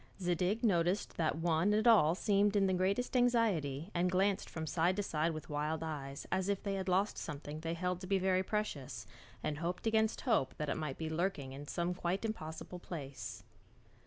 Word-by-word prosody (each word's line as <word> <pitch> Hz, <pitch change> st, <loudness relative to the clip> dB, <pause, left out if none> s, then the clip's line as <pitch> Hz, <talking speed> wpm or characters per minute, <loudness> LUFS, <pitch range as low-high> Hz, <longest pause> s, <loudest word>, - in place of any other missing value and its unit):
Zadig 180 Hz, +4 st, 0 dB
noticed 185 Hz, -2 st, +2 dB
that 155 Hz, -2 st, +1 dB
one 165 Hz, +4 st, +2 dB
and 215 Hz, +2 st, +3 dB
all 180 Hz, -8 st, +6 dB
seemed 205 Hz, +1 st, +2 dB
in 200 Hz, -1 st, +4 dB
the 190 Hz, -, +2 dB
greatest 195 Hz, +8 st, 0 dB
anxiety 205 Hz, -, +2 dB
and 180 Hz, +1 st, +2 dB
glanced 190 Hz, +2 st, +1 dB
from 160 Hz, -1 st, -4 dB
side 170 Hz, +3 st, +2 dB
to 205 Hz, -, -1 dB
side 160 Hz, -2 st, 0 dB
with 155 Hz, -1 st, -6 dB
wild 150 Hz, +2 st, -2 dB
eyes 140 Hz, -3 st, -5 dB
as 190 Hz, +1 st, +1 dB
if 200 Hz, -1 st, 0 dB
they 200 Hz, -2 st, -1 dB
had 190 Hz, -1 st, -2 dB
lost 195 Hz, +3 st, +2 dB
something 150 Hz, 0 st, -6 dB
they 165 Hz, +1 st, -3 dB
held 180 Hz, +1 st, -2 dB
to 185 Hz, -, -6 dB
be 195 Hz, +1 st, +3 dB
very 185 Hz, 0 st, +2 dB
precious, 190 Hz, -9 st, -3 dB, 0.4 s
and 150 Hz, 0 st, -2 dB
hoped 175 Hz, +4 st, -3 dB
against 220 Hz, 0 st, +2 dB
hope 135 Hz, -, +1 dB
that 150 Hz, -1 st, -2 dB
it -, -, 0 dB
might 150 Hz, -4 st, -3 dB
be 160 Hz, -, -3 dB
lurking 160 Hz, -4 st, -1 dB
in 145 Hz, +2 st, -8 dB
some 175 Hz, +3 st, -1 dB
quite 180 Hz, +3 st, -2 dB
impossible 180 Hz, -4 st, -5 dB
place. 140 Hz, -6 st, -7 dB
180 Hz, 195 wpm, -34 LUFS, 155-200 Hz, 0.4 s, all